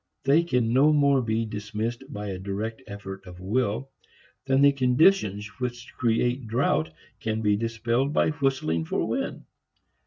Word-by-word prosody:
They 140 +4 +5
can 125 -8 0
no 140 +4 +5
more 140 -3 +4
be 115 -1 -1
dismissed 105 +3 -4
by 105 -5 -5
a 95 -1 -4
direct 105 +5 -4
effort 95 -2 -8
of 90 0 -11
will 115 +6 -1 0.6
than 135 +1 +4
the 140 - +7
conditions 125 - +3
which 120 -1 -5
create 120 +1 0
drought 110 - +1 0.3
can 110 0 -2
be 105 -1 +3
dispelled 115 +4 0
by 155 - +2
whistling 135 - 0
for - - -1
wind. - - -3
115 Hz, 150 wpm, -26 LUFS, 105-135 Hz, 0.6 s, the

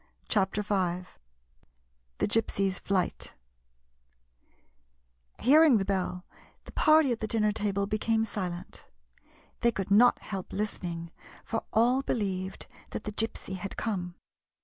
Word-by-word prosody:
56 - - +2
CHAPTER 195 0 +1
V 185 -3 -1 1.1
THE - - +1
GYPSY'S 195 -3 +1
FLIGHT 190 -2 -1 2.0
H - - -10
EARING 300 -2 +7
the 195 - -1
bell, 185 -2 -2 0.4
the - - -10
party 310 -3 +5
at 230 - -1
the 220 - -2
din 220 0 +2
ner 210 - +3
table 200 -1 -1
became 220 +2 +1
silent. 180 -5 -5 0.8
They 235 - +3
could 195 -2 -4
not 240 +5 +6
help 195 -3 -6
listening, 175 -5 -4 0.3
for 225 - -3
all 245 +4 +3
believed 195 -7 -2 0.2
that - - -5
the 210 - -4
Gypsy 210 -3 -3
had 190 +1 -6
come. 180 -5 -3
205 Hz, 130 wpm, -29 LUFS, 190-225 Hz, 2.0 s, EARING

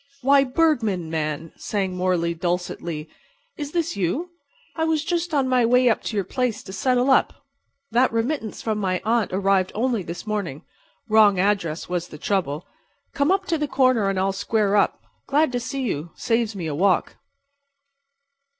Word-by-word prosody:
"Why, 275 +1 +5
Bergman, 245 - +1
man," 155 0 -3
sang 195 -3 -2
Morley, 180 -2 0
dulcetly, 170 -2 -3 0.5
"is 290 -1 -5
this 340 0 -1
you? 230 - -2 0.4
I 320 - -1
was 320 -1 +1
just 345 0 -1
on 280 -4 +1
my 255 -1 +3
way 250 +2 +4
up 225 - +1
to 220 - -3
your 195 - 0
place 245 +1 -2
to 190 - -9
settle 250 +4 +2
up. - - +2 0.5
That 245 +3 +3
remittance 230 0 -2
from 215 -2 -1
my 185 -3 0
aunt 230 -1 +1
arrived 190 0 +2
only 235 -1 0
this 170 +2 -7
morning. 195 -8 -3 0.4
Wrong 215 -3 +5
address 185 -5 0
was 175 -1 -2
the 150 - -10
trouble. 165 -4 -1 0.5
Come 280 +2 +1
up 385 0 +1
to 330 -3 -1
the 300 - 0
corner 255 -7 +3
and 195 - -1
I'll 195 +1 +1
square 200 +1 +1
up. 205 - +1 0.2
Glad 295 +1 +2
to 245 - -1
see 265 +3 -4
you. 165 - -3
Saves 225 -2 0
me 180 -4 -4
a 155 - -2
walk." 185 +6 +1
215 Hz, 170 wpm, -23 LUFS, 180-260 Hz, 0.5 s, Why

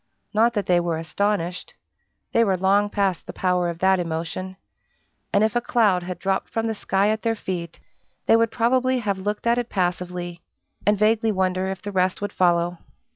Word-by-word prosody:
Not 230 +3 +3
that 205 -3 0
they 175 -1 +3
were 170 -2 -1
astonished 180 +2 -2 0.6
they 230 - +4
were 195 -4 +1
long 200 +3 +3
past 195 -4 -1
the - - -6
power 180 -1 +1
of 170 - -5
that 190 +1 +3
emotion: 170 +3 -4 0.7
and 200 - +3
if 220 +1 +1
a 240 - +2
cloud 210 -7 +2
had 180 0 -5
dropped 190 +2 -1
from 225 0 -2
the 225 - 0
sky 200 -1 +1
at 220 0 0
their 225 -1 0
feet, 175 -5 -5 0.5
they - - +5
would 230 0 +3
probably 255 +3 +2
have 205 -5 -2
looked 205 +3 -3
at 235 +1 +3
it 245 - -4
passively, 180 -2 -2 0.5
and 210 0 +4
vaguely 220 +2 +2
wonder 185 -1 0
if 190 -1 -5
the 205 - -4
rest 185 -1 +1
would 205 0 -4
follow. 175 -1 +2
190 Hz, 190 wpm, -23 LUFS, 180-215 Hz, 0.7 s, they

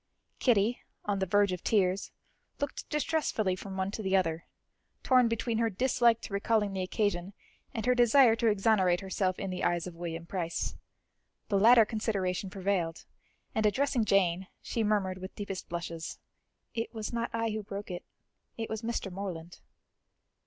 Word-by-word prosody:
Kitty, 230 -1 +3 0.3
on 205 -1 0
the 190 - 0
verge 205 +1 +3
of 180 -1 -4
tears, 195 -2 +2 0.5
looked 285 -1 -4
distressfully 295 - 0
from 190 +1 -7
one 190 +1 -1
to 220 - -5
the 190 -1 +1
other, 165 -3 -1 0.6
torn 255 -2 +5
between 230 0 -1
her 230 -1 +2
dislike 235 +1 +3
to - - -8
recalling 210 0 +1
the 190 - -2
occasion, 185 -1 -1 0.4
and 225 -4 -4
her 250 - +4
desire 245 0 +6
to 230 0 +1
exonerate 195 -4 +3
herself 190 -1 -1
in 195 -2 -4
the 180 - -4
eyes 175 -1 +1
of 180 - -7
William 165 -1 -5
Price. 170 -2 -3 0.7
The 200 -2 +3
latter 230 +2 +7
consideration 200 -4 -1
prevailed, 185 -4 -1 0.5
and 220 - +1
addressing 240 +3 +2
Jane, 190 -3 +2
she 230 - -2
murmured 195 -3 0
with 185 +1 -8
deepest 195 -2 -5
blushes; 170 -1 -5 0.6
"It 225 0 -3
was 220 +1 -4
not 235 0 -1
I 230 -1 -1
who 215 0 -2
broke 200 -1 -6
it, 175 - -5 0.5
it 225 -1 -4
was 220 -1 -3
Mr. 230 -4 -3
Morland." 180 -3 -6
200 Hz, 165 wpm, -30 LUFS, 185-225 Hz, 0.7 s, latter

